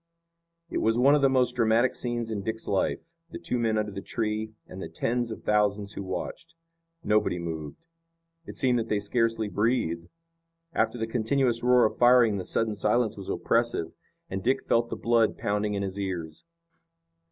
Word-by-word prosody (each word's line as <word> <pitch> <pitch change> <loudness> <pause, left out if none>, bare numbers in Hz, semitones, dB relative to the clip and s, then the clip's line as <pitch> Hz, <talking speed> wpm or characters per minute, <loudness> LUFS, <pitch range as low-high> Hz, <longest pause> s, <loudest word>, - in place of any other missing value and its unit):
It - - -1
was 115 +1 +2
one 135 +4 +5
of 150 - +3
the 135 - +5
most 125 -2 +2
dramatic 115 +2 +3
scenes 120 -2 -2
in 105 -2 -2
Dick's 110 +2 -4
life, 100 - 0 0.3
the - - -7
two 125 - -2
men 110 -2 +1
under 105 -1 -1
the 100 0 -6
tree, 110 0 -3
and 95 - -9
the 80 - -6
tens 120 +8 -1
of 110 - -7
thousands 105 -1 +1
who - - -5
watched. 95 - -6 0.5
Nobody 105 - +2
moved. 80 - -6 0.6
It - - -8
seemed 125 -2 +2
that 115 - -4
they 105 - +1
scarcely 115 +1 0
breathed. 100 -6 -1 0.6
After - - +1
the 110 - -1
continuous 120 +1 0
roar 125 0 +5
of 110 - -1
firing 120 -4 +5
the 95 - -5
sudden 115 -1 0
silence 110 +2 +1
was 100 -2 -8
oppressive, 115 -8 0 0.4
and 95 0 -4
Dick 130 +3 +1
felt 115 0 +2
the - - -3
blood 115 -2 +2
pounding 105 0 -1
in 100 - -2
his 95 0 -4
ears. 90 - -5
110 Hz, 180 wpm, -27 LUFS, 100-120 Hz, 0.6 s, one